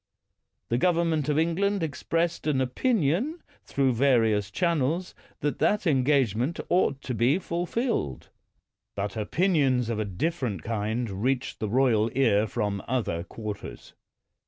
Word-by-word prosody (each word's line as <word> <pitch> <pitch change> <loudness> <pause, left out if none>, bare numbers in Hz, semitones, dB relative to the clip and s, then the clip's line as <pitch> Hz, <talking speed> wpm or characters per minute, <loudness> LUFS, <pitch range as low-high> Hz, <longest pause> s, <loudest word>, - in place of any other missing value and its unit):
The 120 - +1
government 165 -3 +1
of 150 - +1
England 180 +4 +1
expressed 165 +2 -1
an 145 -3 +2
opinion, 205 - 0 0.2
through 135 -2 +1
various 115 -5 +2
channels, 170 - 0 0.3
that 145 - -1
that 210 -1 +2
en 135 -6 +3
gagement 130 - +1
ought 145 -6 +1
to 130 - -3
be 120 +7 +3
fulfilled. 175 - -2 0.7
But 100 0 -3
opinions 130 - +1
of 115 -2 -1
a 110 - 0
different 105 - -2
kind 110 -2 -2
reached 130 +1 -1
the 110 - -2
royal 115 -2 +3
ear 110 -5 +3
from 105 -3 -2
other 115 -9 -1
quarters. 105 - -8
130 Hz, 130 wpm, -27 LUFS, 110-165 Hz, 0.7 s, en